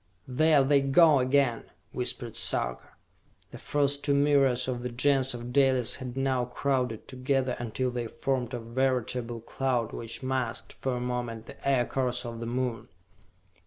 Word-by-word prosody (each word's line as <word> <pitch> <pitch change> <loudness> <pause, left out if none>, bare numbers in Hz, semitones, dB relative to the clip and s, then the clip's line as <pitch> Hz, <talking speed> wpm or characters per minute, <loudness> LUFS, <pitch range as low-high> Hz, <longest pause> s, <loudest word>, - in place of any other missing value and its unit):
"There 150 +2 +4
they 140 +1 +4
go 145 +2 +5
again!" 130 -2 +2 0.3
whispered - - -3
Sarka. - - -1 0.6
The - - -9
first 145 -1 0
two 140 - +2
myriads 140 -3 +3
of 125 -2 -2
the 125 - -3
Gens 130 +1 +1
of 120 +1 -7
Dalis 130 -3 +3
had 130 -1 -7
now 130 -2 +1
crowded 125 -2 -1
together 130 0 -1
until 120 +2 -2
they 120 -1 -3
formed 130 0 -2
a - - -4
veritable 120 -1 -1
cloud 120 -1 -1
which 115 +3 -6
masked, 130 -2 -2
for 130 -2 -3
a - - -3
moment, 120 -2 -3
the - - -5
Aircars 125 -1 0
of 115 -1 -6
the 115 - -4
Moon. 120 -2 -2
125 Hz, 155 wpm, -28 LUFS, 120-135 Hz, 0.6 s, go